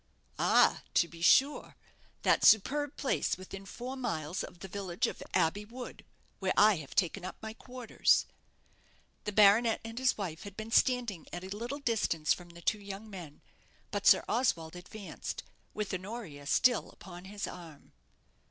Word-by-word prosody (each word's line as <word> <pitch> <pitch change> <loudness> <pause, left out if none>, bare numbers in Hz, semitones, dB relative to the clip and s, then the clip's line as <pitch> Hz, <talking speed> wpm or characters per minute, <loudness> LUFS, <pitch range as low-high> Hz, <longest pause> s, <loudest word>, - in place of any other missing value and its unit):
"Ah, - - +4
to 170 - +4
be 170 0 -13
sure; 270 +11 +4 0.5
that - - +3
superb 285 +7 +4
place 270 - 0
within 195 +1 -9
four 250 +5 -6
miles 180 - -3
of - - -9
the 195 - -6
village 195 +3 -2
of - - -4
Abbey 200 +6 +2
wood, 245 +4 -9 0.4
where 190 -1 0
I 210 -2 +6
have 145 -4 -9
taken 185 0 +1
up 185 - -6
my 220 0 -7
quarters." 250 0 +1 1.0
The 210 - -1
baronet 215 +3 +5
and 225 +1 -6
his 260 0 +2
wife 175 -6 -4
had 200 -1 -10
been 220 +1 -6
standing 235 - +2
at 175 +1 -6
a 190 +2 -6
little 240 +6 -4
distance 205 - +1
from 175 -1 -10
the 170 0 -13
two 210 +4 +1
young 200 +2 -8
men; 170 -7 -9 0.5
but - - -1
Sir - - +7
Oswald 170 -10 0
advanced, 190 +3 -7 0.3
with 210 -2 -3
Honoria 185 -7 -6
still 245 - +3
upon 180 -1 -12
his 205 +1 -5
arm. 165 -5 -11
200 Hz, 160 wpm, -31 LUFS, 175-230 Hz, 1.0 s, Sir